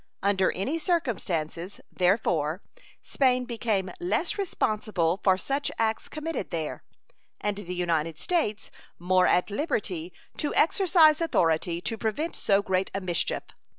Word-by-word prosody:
Under 195 -1 +3
any 270 - -2
circumstances, 190 - -2
therefore, 180 -3 +1 0.4
Spain 255 -2 +2
became 220 -5 -1
less 350 +1 0
responsible 215 - 0
for 190 -2 +3
such 275 +8 -1
acts 225 -1 -1
committed 310 - -4
there, 160 -3 -3 0.6
and 205 -1 -2
the 180 -3 -5
United 165 -3 -1
States 265 - -1 0.3
more 185 +1 +3
at 180 +3 +2
liberty 195 - -2 0.3
to 295 - -2
exercise 325 -2 +5
authority 170 - +1
to 225 +3 -3
prevent 285 +11 -2
so 200 -1 +2
great 190 -1 0
a - - 0
mischief. 175 -3 -1
200 Hz, 125 wpm, -27 LUFS, 180-275 Hz, 0.6 s, exercise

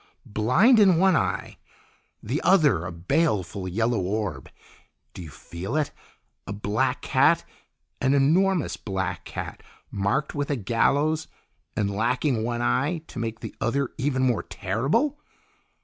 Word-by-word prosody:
Blind 130 - +4
in 190 -5 +6
one 190 0 +4
eye, - - -1 0.7
the 130 +8 -2
other 150 - +3
a - - -5
baleful 95 - -1
yellow 110 +4 0
orb! 100 +2 -3 0.6
Do - - -8
you 80 - -8
feel 85 - -7
it? 155 -2 0 0.6
A 100 - -4
black 105 +5 -1
cat, - - +3 0.6
an 135 +2 +3
enormous 170 +5 +2
black 95 -2 -4
cat - - -6 0.3
marked 100 +9 -1
with 145 -1 -2
a 145 - +1
gallows, 140 +8 +1 0.5
and 100 -1 0
lacking 120 +2 0
one 120 +1 -2
eye, 150 +7 0
to - - -7
make 115 -1 -4
the - - -7
other 135 +3 0
even 130 -1 0
more 125 -4 +2
terrible! 135 - -1
125 Hz, 135 wpm, -25 LUFS, 105-150 Hz, 0.7 s, in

